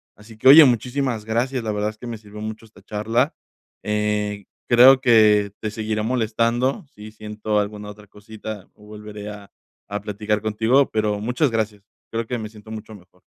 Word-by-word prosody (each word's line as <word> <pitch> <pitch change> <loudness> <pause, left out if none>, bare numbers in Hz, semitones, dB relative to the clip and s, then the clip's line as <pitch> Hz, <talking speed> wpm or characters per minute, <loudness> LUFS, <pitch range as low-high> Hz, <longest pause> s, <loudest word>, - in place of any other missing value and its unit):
Así 110 +1 -15
que 130 - +1
oye, 155 +3 +11
muchísimas 125 -2 0
gracias. 120 +3 -1
La 110 - -2
verdad 105 0 -1
es 110 - -20
que 120 - -8
me 115 -1 -5
sirvió 105 0 -11
mucho 110 +1 -6
esta 110 - -19
charla, 115 +7 0 0.5
eh, 105 -1 -1 0.2
creo 130 +2 +7
que 105 -5 +4
te 110 - -3
seguiré 110 0 -3
molestando. 120 +3 0
Sí, 105 +1 -11
siento 105 0 -3
alguna 105 0 -4
otra 105 0 -13
cosita. 105 0 -9
Volveré 105 0 -10
a 105 -1 -10 0.4
a 105 +1 -4
platicar 105 0 -2
contigo, 110 +6 +2
pero 105 -1 0
muchas 125 +7 0
gracias. 110 -2 -2 0.3
Creo 115 0 -2
que 125 - -2
me 110 -1 -6
siento 110 -1 -15
mucho 110 0 -8
mejor. 90 -1 -20
110 Hz, 175 wpm, -22 LUFS, 105-115 Hz, 0.5 s, oye